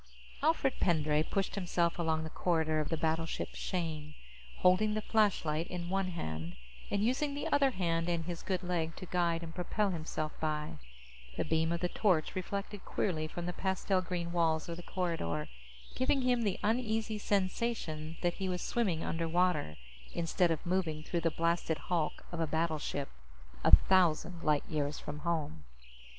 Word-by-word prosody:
_ - - -30 0.4
Alfred 290 -3 +2
Pendray 155 -3 +3
pushed 195 +5 -1
himself 175 -3 0
along 160 -1 +1
the 160 - -6
corridor 160 -3 +1
of 155 - -1
the 165 - 0
battleship 160 +1 -1
Shane, 155 -4 -3 0.4
holding 210 +4 +4
the 215 - 0
flashlight 170 -7 +2
in 175 -1 -4
one 195 -1 +1
hand 80 - -4 0.3
and 200 0 +1
using 280 +5 +1
the 290 - -3
other 280 -1 +4
hand 170 -6 0
and 170 -2 0
his 175 -1 -4
good 185 -1 -2
leg 165 -2 -1
to 185 - -7
guide 170 -2 +1
and 165 0 -7
propel 195 +3 0
himself 155 -2 -3
by. 150 - -2 0.6
The - - 0
beam 160 0 +1
of 170 - -1
the 180 - +2
torch 175 -4 +2
reflected 200 +2 -4
queerly 155 -5 -1
from 170 +2 -5
the 180 - -2
pastel 190 0 0
green 175 -2 -3
walls 165 -2 +2
of 170 -1 -4
the - - -6
corridor, 165 - -2 0.5
giving 260 +1 +2
him 250 -1 +3
the 205 -4 0
uneasy 220 -1 0
sensation 185 -6 -1
that 175 0 +2
he 190 - 0
was 180 -1 -2
swimming 190 -9 0
underwater 165 - +1 0.4
instead 170 +1 +2
of 165 -2 -1
moving 170 -4 0
through 170 +1 -1
the 165 - +3
blasted 165 0 0
hulk 170 -4 -2
of 170 - -4
a 165 - +1
battleship, 155 -3 -1 0.6
a - - +10
thousand 175 -2 +3
light 150 -3 +2
years 150 -1 -1
from 150 0 -6
home. 150 - -2
170 Hz, 170 wpm, -33 LUFS, 160-190 Hz, 0.6 s, a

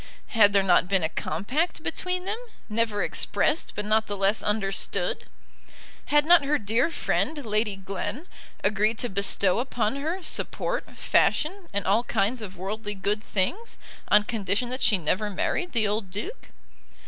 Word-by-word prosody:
Had 210 -3 +5
there 200 -1 +3
not 180 -1 +4
been 195 -3 +2
a 160 - 0
compact 245 - -2
between 365 0 -2
them, 420 +4 -2 0.3
never 220 -2 0
expressed, 320 - 0
but 210 - -3
not 220 +1 +2
the 205 - -3
less 195 +2 +2
understood? 195 -2 0 0.8
Had 295 0 +3
not 345 -1 +6
her 295 +2 +1
dear 225 +7 +1
friend, 305 -3 -1
Lady 215 -1 0
Glen, 200 - -5 0.4
agreed 215 +2 +1
to 245 - -3
bestow 195 0 +4
upon 245 -1 -1
her 325 +6 -3
support, - - -3
fashion, 355 +4 +1
and 200 -1 -1
all 205 +5 +3
kinds 225 +2 0
of 195 -3 -7
worldly 205 +3 -4
good 205 +2 -1
things, 340 - -2 0.3
on 210 0 +5
condition 215 +1 -1
that 255 - -4
she 210 - +4
never 185 +5 -1
married 350 - -2
the 225 -4 +1
old 205 -1 -2
Duke? 210 - -6
215 Hz, 160 wpm, -26 LUFS, 200-265 Hz, 0.8 s, not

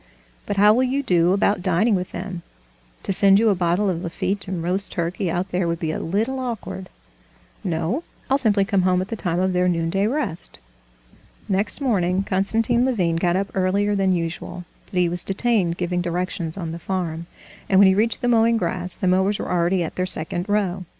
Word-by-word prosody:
"But 205 - -2
how 210 +2 +6
will 245 - +2
you 260 +2 0
do 175 -6 +3
about 200 0 +2
dining 185 +5 +2
with 185 -2 -1
them? 185 -3 -6 0.6
To 195 - -1
send 195 +1 +5
you 225 +1 +4
a - - +4
bottle 180 +2 +1
of 175 -3 -1
Lafitte 195 +3 -3
and 180 -3 -3
roast 190 +3 -2
turkey 175 +2 -2
out 180 +3 -2
there 180 -1 0
would 170 0 -1
be 160 -3 -2
a - - -3
little 225 +10 -1
awkward." 225 -6 -5 0.7
"No, 175 - -1 0.2
I'll 270 +1 +2
simply 205 -6 +2
come 195 -1 +1
home 180 0 +2
at 185 - -5
the 225 - -3
time 175 -5 -1
of 185 0 +1
their 180 0 +2
noonday 175 +3 +1
rest." 230 - -3 0.9
Next 200 +7 -1
morning 190 -7 +1
Konstantin 225 +5 +1
Levin 185 -11 +1
got 175 +1 +1
up 195 +1 -1
earlier 195 +2 +1
than 195 -1 +2
usual, 175 0 -3 0.2
but 185 - -6
he 180 - +3
was 175 +1 -3
detained 195 -4 0
giving 180 0 -1
directions 175 -1 -3
on 170 -4 -4
the 165 - -6
farm, 170 -3 -3 0.4
and 190 - +4
when 195 0 +8
he 190 - +5
reached 220 +4 0
the 245 - 0
mowing 230 -1 +4
grass 180 -1 -3
the - - -4
mowers 190 +3 +2
were - - -5
already 175 +1 +1
at 160 - -6
their 185 0 0
second 175 +3 0
row. 195 -3 0
185 Hz, 205 wpm, -22 LUFS, 175-205 Hz, 0.9 s, when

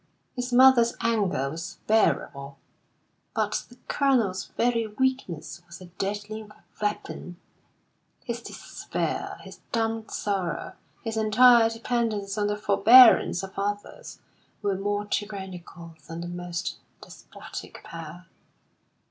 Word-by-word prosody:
His 250 0 -3
mother's 245 -2 +6
anger 200 - 0
was 170 +5 -7
bearable, 140 -10 +1 0.8
but - - -1
the 245 - -15
Colonel's 235 -10 +1
very 230 -1 +1
weakness 210 - -2
was 170 0 -11
a 185 - -11
deadly 205 +2 -3 0.4
weapon. 205 -4 -3 0.9
His 235 0 -4
despair, - - -4
his - - -12
dumb 225 -2 -1
sorrow, 195 -4 -2 0.3
his 225 -2 -3
entire 225 +2 +6
dependence 225 -3 -2
on 205 -1 0
the 210 0 -1
forbearance 215 -1 +7
of 190 0 -7
others, 205 +1 -4 0.5
were 200 -1 +1
more 205 +1 -2
tyrannical 190 -5 -5
than 165 +1 -6
the 175 - -5
most 175 -1 -4 0.2
despotic - - -10
power. 165 +2 -9
205 Hz, 110 wpm, -26 LUFS, 180-230 Hz, 0.9 s, forbearance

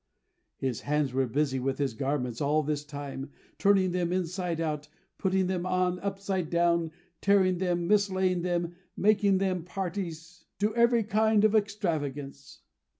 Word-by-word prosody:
His 130 -4 -2
hands 145 -2 0
were 130 0 +1
busy 135 +1 0
with 135 +1 -1
his 140 -4 -1
garments 125 -1 -2
all 150 +2 +2
this 150 0 -2
time; 145 -1 -6 0.3
turning 195 -2 +4
them 175 -1 -1
inside 180 -1 -2
out, 150 -2 -2 0.3
putting 190 -1 +1
them 180 -1 -1
on 185 0 0
upside 195 -3 -2
down, 170 -1 +2 0.3
tearing 190 -3 +3
them, 175 -2 0
mislaying 190 -3 +2
them, 175 -1 -1 0.2
making 205 -1 +3
them 185 -3 0
parties 180 -2 -5
to 210 +2 0
every 235 -1 +4
kind 215 0 +3
of 215 - +3
extravagance. 150 -10 -2
175 Hz, 145 wpm, -29 LUFS, 150-195 Hz, 0.3 s, turning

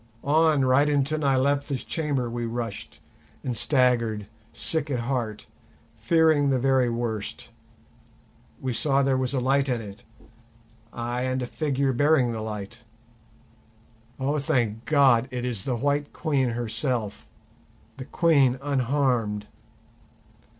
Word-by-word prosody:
On, 155 -1 +3
right 135 +3 +4
into 145 +1 +1
Nyleptha's 140 -1 0
chamber 145 -6 -2
we 120 0 -3
rushed 115 -2 -5 0.4
and 125 -2 -3
staggered, 115 -4 +1 0.3
sick 160 -2 -1
at 125 -4 -1
heart, 115 -4 -3 0.5
fearing 145 +5 +3
the 135 - +2
very 130 -1 +2
worst; 115 -3 -4 1.1
we 130 -2 -3
saw 140 +3 +2
there 135 -1 +2
was 130 +1 -1
a - - +1
light 135 +2 +1
in 125 -2 0
it, 100 -2 -10 0.9
ay, 120 +1 -3
and 130 0 -1
a - - -2
figure 140 0 -1
bearing 145 -2 +3
the 110 -1 -4
light. 110 +1 -6 1.4
Oh, 140 +3 0
thank 120 -7 0
God, 135 -5 +4
it 125 -1 -4
is 115 -6 -2
the 130 - -1
White 145 +3 -1
Queen 140 -6 0
herself, 115 -1 -2 0.7
the 130 - -7
Queen 140 -7 +3
unharmed! 130 -6 0
130 Hz, 125 wpm, -25 LUFS, 120-140 Hz, 1.4 s, right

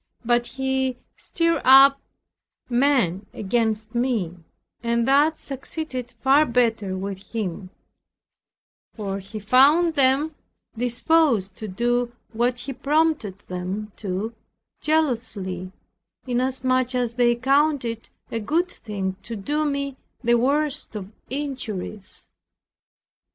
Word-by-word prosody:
But 240 0 +2
he 265 -1 -1 0.2
stirred 335 -3 0
up 275 +1 +8 0.7
men 240 -8 +2
against 220 +1 -1
me, 235 -8 0 0.5
and 235 0 +1
that 295 +4 +4
succeeded 270 -2 -5
far 275 +3 +6
better 225 -5 +1
with 195 0 -4
him; 190 -4 -4 1.3
for 200 -3 -3
he 200 +3 -9
found 275 - +5
them 280 +2 +3 0.4
disposed 245 - +2
to 215 - -5
do 240 +4 0 0.2
what 240 +2 +1
he 265 +2 -5
prompted 285 - +1
them 185 +4 -5
to, 205 +3 -3 0.5
zealously, 225 - -1 0.5
inasmuch 255 0 0
as 245 -2 0
they 240 0 +3
counted 275 +2 +2
it 230 -1 -5 0.2
a 230 - -1
good 330 - 0
thing 195 -4 -4
to 230 - -6
do 295 +10 -1
me 280 -2 -2 0.3
the 240 0 +3
worst 280 +2 +1
of 200 -1 -6 0.2
injuries. 220 - -5
245 Hz, 110 wpm, -24 LUFS, 215-275 Hz, 1.3 s, up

